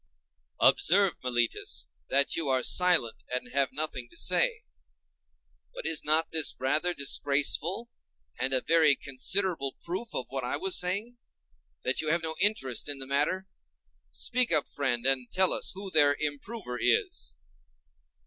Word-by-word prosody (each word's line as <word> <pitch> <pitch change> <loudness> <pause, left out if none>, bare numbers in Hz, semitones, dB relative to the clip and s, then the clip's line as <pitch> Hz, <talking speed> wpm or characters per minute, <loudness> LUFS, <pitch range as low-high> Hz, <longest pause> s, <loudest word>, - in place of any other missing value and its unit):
Observe, 195 0 +4
Meletus, 120 -2 -1 0.2
that 140 +1 +2
you 165 -3 -2
are 130 -1 +1
silent, 180 -10 +3
and 125 -1 -3
have 140 0 +1
nothing 135 -4 -3
to - - -14
say. - - +1 1.1
But - - -8
is 160 -1 -1
not 155 +2 +2
this 160 -2 +1
rather 155 +7 +1
disgraceful, 145 - +1 0.5
and 130 - -1
a 130 -1 +2
very 160 -3 +4
considerable 140 +2 0
proof 190 +7 -5
of 130 - 0
what 135 -1 -3
I 125 - -1
was 190 -1 -1
saying, 200 +7 -1 0.7
that 130 - 0
you 155 - -2
have 165 +1 +1
no 160 0 -2
interest 150 - +1
in 145 - -1
the 135 - -7
matter? 150 +8 0 0.6
Speak 245 - +1
up, 155 -3 +2
friend, 130 -4 -2
and 130 -2 0
tell 185 0 +3
us - - -3
who 195 0 -7
their 145 -3 +4
improver 145 - -5
is. 120 - 0
150 Hz, 150 wpm, -28 LUFS, 130-180 Hz, 1.1 s, Observe